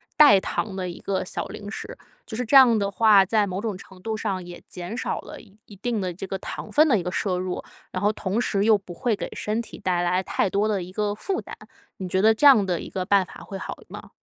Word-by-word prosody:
代 250 -10 +8
糖 195 +1 -3
的 185 -1 -3
一 175 - -8
个 195 -1 -2
小 - - -4
零 205 - -8
食， - - -7 0.3
就 220 - -6
是 250 - -2
这 275 - +1
样 250 -4 +8
的 200 -1 -1
话， 210 -3 +5
在 210 +1 +2
某 185 0 -3
种 220 -3 -3
程 190 -1 -14
度 220 +3 -3
上 195 -4 -3
也 175 0 -10
减 180 +4 -7
少 - - -2
了 - - -10
一 205 -2 -21
一 205 - -14
定 225 +3 -2
的 185 -2 -3
这 190 +3 -7
个 195 - -3
糖 - - -7
分 305 +2 +5
的 235 -7 +4
一 - - -3
个 180 +1 -4
摄 185 -3 -1
入， 185 0 -4 0.3
然 185 - -4
后 210 - +4
同 205 +1 -2
时 200 -4 0
又 220 -1 +6
不 190 -3 -11
会 235 +4 0
给 - - -5
身 215 +2 -2
体 - - -10
带 180 -3 0
来 180 +1 +1
太 190 - 0
多 205 +3 +1
的 200 -4 -1
一 180 - -10
个 205 +1 -1
负 375 - -3
担， - - -9 0.4
你 190 - -5
觉 190 +1 +1
得 220 +2 +6
这 290 - +1
样 265 -7 +8
的 180 -3 -1
一 - - -7
个 185 - -3
办 200 -1 +3
法 - - -13
会 195 - -7
好 - - -6
吗？ - - -11
200 Hz, 290 characters per minute, -24 LUFS, 185-220 Hz, 0.4 s, 代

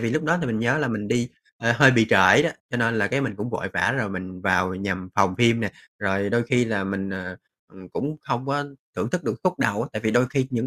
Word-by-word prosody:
vì 115 -1 -1
lúc 155 +5 -1
đó 165 +3 +2
thì 155 - -2
mình 110 -3 -1
nhớ 120 +6 +1
là 145 -4 0
mình 105 -3 -3
đi, 120 0 0 0.3
ờ, 115 0 +1
hơi 135 +1 +8
bị 115 -4 +4
trễ - - +7
đó, - - +1 0.2
cho - - -2
nên 115 -1 +1
là 105 - +2
cái 135 +5 0
mình 135 -6 -2
cũng 105 +5 -4
vội - - -3
vã - - +1
rồi 110 -5 -1
mình 95 -1 -7
vào 95 -1 +1
nhằm 95 -1 -4
phòng 95 -3 +3
phim 115 -1 +4
nè. 105 -4 -2 0.3
Rồi 100 0 -1
đôi 120 0 +2
khi 125 +1 +2
là 105 -4 -2
mình, 95 0 -3
ờ, 90 -1 -6 0.4
ừm, 95 -1 -14
cũng 150 +9 -4
không 120 +2 -3
có 145 +1 -1 0.3
thưởng - - -2
thức 180 -1 -2
được - - -1
khúc 180 -1 +1
đầu 105 -1 0
á, - - -5
tại 110 - -4
vì 110 - +1
đôi 120 +3 +3
khi 135 -1 0
những 120 -1 -1
115 Hz, 280 wpm, -24 LUFS, 95-125 Hz, 0.4 s, hơi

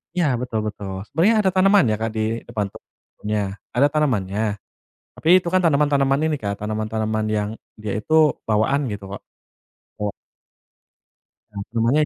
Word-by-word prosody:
Ya, 175 - +2
betul 120 -3 -2
betul. 95 -2 -6
Sebenarnya 185 +9 +3
ada 190 - +3
tanaman 195 +1 +5
ya, - - +2
Kak, 110 0 -2
di 110 +1 -1
depan 105 -2 -2
pohonnya. 105 -2 -6 0.2
Ada 140 +4 +5
tanamannya. 110 -10 0 0.8
Tapi 160 - -2
itu 170 - -4
kan 185 - +4
tanaman-tanaman 140 -2 +3
ini, 150 - 0
Kak, 100 -1 -3
tanaman-tanaman 110 0 -1
yang 105 -1 0 0.3
dia 105 -2 -4
itu 130 +9 -6 0.3
bawaan, 120 +6 +1
gitu 100 -1 -6
Kak. 100 - -7 0.8
Wak 105 -1 -2 1.4
Ya, 105 - -12 0.2
namanya 120 +7 +3
110 Hz, 145 wpm, -22 LUFS, 105-145 Hz, 1.4 s, tanaman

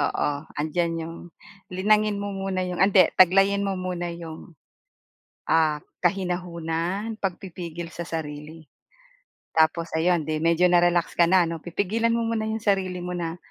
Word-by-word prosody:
Oo, 145 0 0 0.3
andiyan 165 +2 -1
yung 165 +1 -7 0.6
linangin 210 +2 +2
mo 205 0 -4
muna 195 -1 -2
yung 180 -1 -4
ah, 190 - +7
hindi, 185 -4 +6
taglayin 195 +2 +5
mo 195 -1 -1
muna 180 -1 -3
yung, 165 -1 -10 0.9
ah, 155 -2 +3 0.2
kahinahunan, 180 +2 -1
pagpipigil 175 -3 -5
sa 170 - -5
sarili. 155 -1 -7 0.8
Tapos 160 +1 +2
ayon, 170 -1 +2
'di 155 0 -2
medyo 170 +2 +3
na-relax 175 -1 +3
ka 170 -1 +5
na 185 -1 +5
'no, 165 -1 -4
pipigilan 210 +7 0
mo 230 0 0
muna 220 -1 -1
yung 220 0 -2
sarili 190 -3 0
mo 180 - -4
na 170 -1 -3
175 Hz, 145 wpm, -25 LUFS, 165-195 Hz, 0.9 s, ah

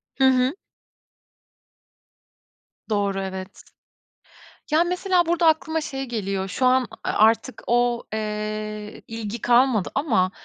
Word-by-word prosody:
Hı 270 - 0
hı. 260 +2 +4 2.3
Doğru, 200 -2 0
evet. 190 0 -7 1.1
Ya, 315 +2 +5
mesela, 360 0 +1
burada 340 0 +2
aklıma 320 0 +2
şey 270 -3 -4
geliyor, 195 -5 -3
şu 195 +7 -1
an 255 -1 +3 0.2
a - - -1
artık 225 +4 +2
o, 240 0 +2
eee, 215 0 -4
ilgi 225 0 -5
kalmadı 240 -4 +3
ama 200 - +2
235 Hz, 110 wpm, -23 LUFS, 210-270 Hz, 2.3 s, Ya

